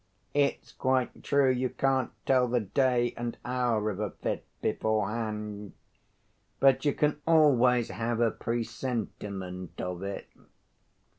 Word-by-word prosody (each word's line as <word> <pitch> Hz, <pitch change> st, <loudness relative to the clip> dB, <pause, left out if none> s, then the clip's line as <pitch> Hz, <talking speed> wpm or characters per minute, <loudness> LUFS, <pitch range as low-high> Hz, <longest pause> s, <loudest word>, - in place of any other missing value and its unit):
It's 145 Hz, -1 st, +1 dB
quite 130 Hz, -1 st, 0 dB
true 140 Hz, -2 st, +3 dB
you 130 Hz, 0 st, 0 dB
can't 135 Hz, -1 st, +1 dB, 0.2 s
tell 130 Hz, -2 st, +4 dB
the 120 Hz, 0 st, +1 dB
day 120 Hz, +3 st, +1 dB
and 120 Hz, 0 st, -4 dB
hour 120 Hz, -4 st, 0 dB
of 100 Hz, -, -6 dB
a 105 Hz, -1 st, -1 dB
fit -, -, -4 dB, 0.2 s
beforehand, 105 Hz, -1 st, -2 dB, 0.9 s
but 135 Hz, +1 st, +4 dB
you 145 Hz, -, +2 dB
can 150 Hz, 0 st, +1 dB
always 125 Hz, -7 st, +5 dB
have 115 Hz, +4 st, -2 dB
a 115 Hz, -2 st, +3 dB
presentiment 105 Hz, -6 st, -4 dB
of 90 Hz, 0 st, -4 dB
it." 100 Hz, 0 st, -5 dB
120 Hz, 125 wpm, -29 LUFS, 105-130 Hz, 0.9 s, always